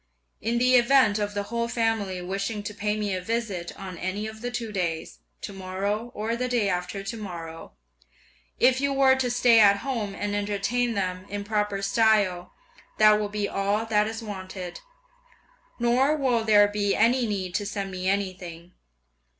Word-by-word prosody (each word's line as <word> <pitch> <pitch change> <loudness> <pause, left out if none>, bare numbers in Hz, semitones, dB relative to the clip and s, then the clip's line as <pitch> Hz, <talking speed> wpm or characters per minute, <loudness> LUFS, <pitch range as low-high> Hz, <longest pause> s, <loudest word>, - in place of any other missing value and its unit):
In 230 +2 0
the 250 +1 +5
event 240 -4 +4
of 205 0 -2
the 205 - -1
whole 235 0 0
family 225 -6 -1
wishing 195 +3 -3
to 210 - -5
pay 210 +1 -1
me 205 -2 -1
a 185 - -2
visit 200 -4 -3
on 185 -3 -8
any 190 +4 -3
of 220 0 -8
the 245 - -3
two 235 -3 -4
days, 170 -5 -3 0.2
to 200 - -6
morrow 195 +4 -3
or 220 +2 -2
the 250 +1 -2
day 240 -5 +1
after 180 +2 -3
to 200 +4 -5
morrow, 170 -6 -8 0.9
if 260 +1 +4
you 280 0 +1
were 270 -1 +5
to 265 -1 0
stay 245 -1 +5
at 200 -2 +6
home 220 -7 -2
and 205 0 -2
entertain 210 +4 -1
them 185 -1 -3
in 205 0 -4
proper 210 -1 -1
style, 200 -4 +2 0.5
that 215 0 +6
will 210 -1 -2
be 205 0 -2
all 200 +3 0
that 210 -1 +2
is 225 +1 -5
wanted; 185 -3 -7 1.0
nor 250 +5 +3
will 255 -6 +1
there 205 -2 +6
be 205 -1 0
any 235 +2 +3
need 190 -4 -3
to 205 - -1
send 200 -2 -4
me 185 0 -2
anything! 185 -3 -3
210 Hz, 175 wpm, -26 LUFS, 195-230 Hz, 1.0 s, at